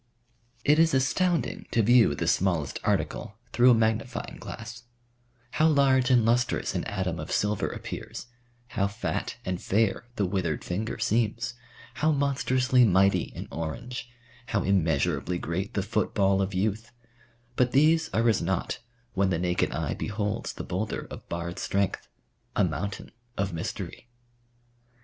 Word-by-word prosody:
It 150 +2 +5
is 165 -2 +4
astounding 170 +6 +1
to 115 - +2
view 115 -8 +5
the - - -2
smallest 85 -7 +1
article - - -1 0.2
through 120 +2 +6
a 120 - +7
magnifying 110 +3 -1
glass; 110 +1 -8 0.7
how 155 - +3
large 135 -4 +4
and 120 -3 +5
lustrous 120 +1 +1
an - - -2
atom 95 -4 -2
of 75 - -6
silver 105 -1 +1
appears; - - -6 0.4
how 100 -2 0
fat 100 - -3
and 90 -1 -2
fair 110 +3 +1
the 100 - +1
withered 90 -5 -1
finger 105 +6 -3
seems; 115 +1 0 0.4
how 155 +1 +2
monstrously 130 -3 +2
mighty 100 -2 +3
an - - -6
orange; 120 +10 -5 0.4
how 105 -3 0
immeasurably 90 -1 +1
great 90 +5 -3
the 100 - +1
football 100 -2 +1
of 95 0 -2
youth; 110 +4 -1 0.6
but 125 0 +2
these 160 +4 +4
are 115 +1 +2
as 110 -4 +3
nought 95 +1 -1 0.3
when 100 0 +2
the 90 - +1
naked 90 +1 0
eye - - -2
beholds 105 -1 -3
the - - -6
boulder 100 +4 -3
of - - -10
barred 85 +1 -4
strength 100 -1 -1 0.5
a - - +3
mountain 90 +4 -3 0.3
of 100 -2 -1
mystery. 85 +5 -5
105 Hz, 145 wpm, -27 LUFS, 95-125 Hz, 0.7 s, a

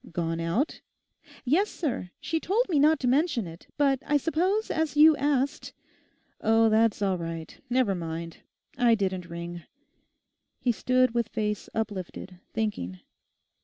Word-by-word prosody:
'Gone 165 -1 -2
out?' 170 - -1 0.6
'Yes, 345 +11 +3
sir; 260 - -3
she 325 +1 -1
told 435 +10 +1
me 310 -5 +2
not 310 +2 +5
to 250 - 0
mention 275 - +2
it; 165 0 -11
but 275 -2 +2
I 295 - +2
suppose 360 +9 0
as 315 -2 -1
you 310 +1 +8
asked—' 280 +1 0 0.7
'Oh, 225 +1 +4
that's 220 -1 +3
all 190 -2 +1
right; 165 -1 -6
never 250 -5 +2
mind; 165 -1 -5 0.4
I 235 -2 +5
didn't 185 -4 -2
ring.' 170 0 -6 1.0
He 245 - +2
stood 255 +1 +2
with 235 -2 0
face 210 -2 -2
uplifted, 190 -4 -4
thinking. 95 - -3
230 Hz, 140 wpm, -27 LUFS, 180-290 Hz, 1.0 s, you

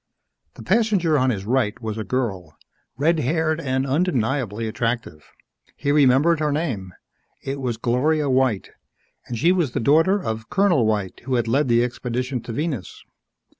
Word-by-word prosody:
The - - -10
passenger 190 - +2
on 130 -2 +3
his 100 -5 -2
right 120 -2 0
was 110 -2 -4
a - - -2
girl 100 -11 -3 0.4
red 160 +4 +2
haired 160 +3 0
and 130 -1 -1
undeniably 130 - 0
attractive. 115 -8 -3 0.5
He 145 - -1
remembered 145 +3 +4
her 150 -1 0
name. 130 - -2 0.5
It 135 +1 -4
was 120 -3 -2
Gloria 145 +5 +1
White, 130 -6 +1 0.6
and 120 - -4
she 165 +9 +3
was 170 -9 0
the - - -1
daughter 165 - +3
of 110 - -5
Colonel 180 - +3
White 105 -4 -2
who 130 -1 0
had 120 -2 0
led 135 +5 +2
the 120 0 +3
expedition 125 +1 -3
to 115 - -8
Venus. 140 - -4
130 Hz, 160 wpm, -22 LUFS, 115-155 Hz, 0.6 s, remembered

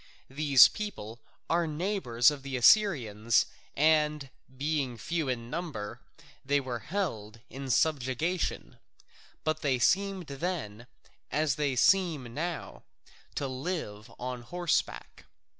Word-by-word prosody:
These 140 -2 +7
people 120 - -6 0.3
are 170 0 +1
neighbours 150 - +2
of 145 -2 -7
the 135 -1 -4
Assyrians, 120 - +4 0.3
and 150 -2 +2 0.3
being 140 -4 -1
few 165 +1 -2
in 120 -2 -4
number, 145 -10 -5 0.4
they 145 +1 +2
were 130 -3 -4
held 115 - -4
in 135 0 -7
subjection. 150 +5 0 0.6
But 155 0 -1
they 135 -4 +1
seemed 190 - +1
then, 140 - -4 0.4
as 155 -1 +1
they 140 -1 -1
seem 155 -6 +2
now, 170 +5 -4 0.5
to 140 - -2
live 130 - -5
on 125 0 -5
horseback. 175 +7 -2
140 Hz, 110 wpm, -29 LUFS, 120-165 Hz, 0.6 s, These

